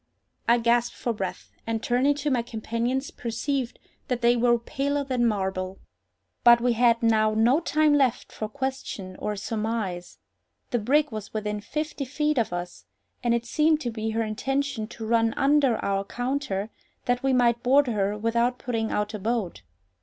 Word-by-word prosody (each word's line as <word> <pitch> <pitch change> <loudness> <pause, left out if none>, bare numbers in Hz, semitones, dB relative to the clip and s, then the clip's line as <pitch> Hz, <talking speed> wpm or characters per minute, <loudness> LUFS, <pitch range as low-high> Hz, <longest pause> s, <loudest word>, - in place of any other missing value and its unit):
I 235 - +6
gasped 235 0 +2
for 240 - -2
breath, 195 -4 -5 0.2
and 225 0 -2
turning 260 +4 +2
to 290 0 -2
my 250 -2 +2
companions, 235 +4 -2
perceived 245 +2 -3 0.3
that 250 -1 -1
they 240 +1 +5
were 240 0 +3
paler 280 +4 -2
than 255 -3 +1
marble. 190 -3 -2 0.7
But 235 0 +8
we 245 0 +2
had 235 0 +3
now 215 -1 +3
no 235 +7 +4
time 310 -2 +2
left 265 -4 +1
for 215 - -5
question 220 -7 -4
or 210 - -2
surmise—the 215 +1 -5
brig 290 +7 +2
was 215 -1 -7
within 210 -1 -2
fifty 300 +3 -4
feet 300 +1 0
of 225 - 0
us, 175 - -6 0.4
and 235 -1 +3
it 235 0 -2
seemed 305 +4 +2
to 240 - -2
be 220 0 -3
her 225 +1 0
intention 265 +1 -2
to 225 0 -8
run 225 0 +2
under 275 -3 +4
our 195 0 0
counter, 245 -3 -3 0.3
that 245 0 +1
we 270 - +1
might 240 -2 +3
board 275 +3 +4
her 210 -4 0
without 235 +3 +1
putting 225 -3 -2
out 210 +1 -1
a 215 - -4
boat. 215 - -2
235 Hz, 170 wpm, -26 LUFS, 215-265 Hz, 0.7 s, But